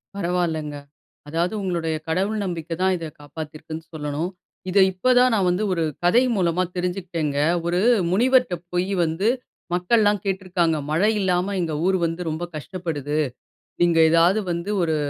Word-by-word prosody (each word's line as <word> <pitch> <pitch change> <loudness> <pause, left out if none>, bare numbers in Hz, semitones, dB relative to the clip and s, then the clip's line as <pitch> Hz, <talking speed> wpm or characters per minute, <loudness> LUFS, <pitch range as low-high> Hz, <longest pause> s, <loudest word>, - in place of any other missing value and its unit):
பரவால்லங்க. 170 -5 -1 0.5
அதாவது 170 +6 -1
உங்களுடைய 170 -4 -1
கடவுள் 195 +6 0
நம்பிக்கைதான் 175 +1 -1
இத 165 - -6
காப்பாத்தியிருக்குன்னு 155 +2 -8
சொல்லணும். 150 +3 -3 0.4
இதை 190 +1 +5
இப்போ 185 +7 -1
தான் 250 0 +5
நான் 195 -4 +2
வந்து 180 +4 0
ஒரு 165 - 0 0.2
கதை 230 +9 +5
மூலமா 180 -2 +1
தெரிஞ்சுக்கிட்டேங்க. 175 -5 -2 0.3
ஒரு 175 +1 +1 0.3
முனிவர்ட்ட 250 +1 +3 0.2
போயி 185 +3 0
வந்து, 165 +5 0 0.5
மக்கள்லாம் 205 +3 +2
கேட்டுருக்காங்க. 185 -4 0
"மழை 195 +8 +3
இல்லாம 185 +1 +1
எங்க 160 -2 -2
ஊர் 190 0 +3
வந்து 165 +1 -3
ரொம்ப 160 +2 -3
கஷ்டப்படுது. 150 -2 -4 0.6
நீங்க 170 -1 +4
ஏதாவது 170 +5 +4
வந்து 170 +3 -3
ஒரு, 160 -2 +1
175 Hz, 135 wpm, -23 LUFS, 160-190 Hz, 0.6 s, இதை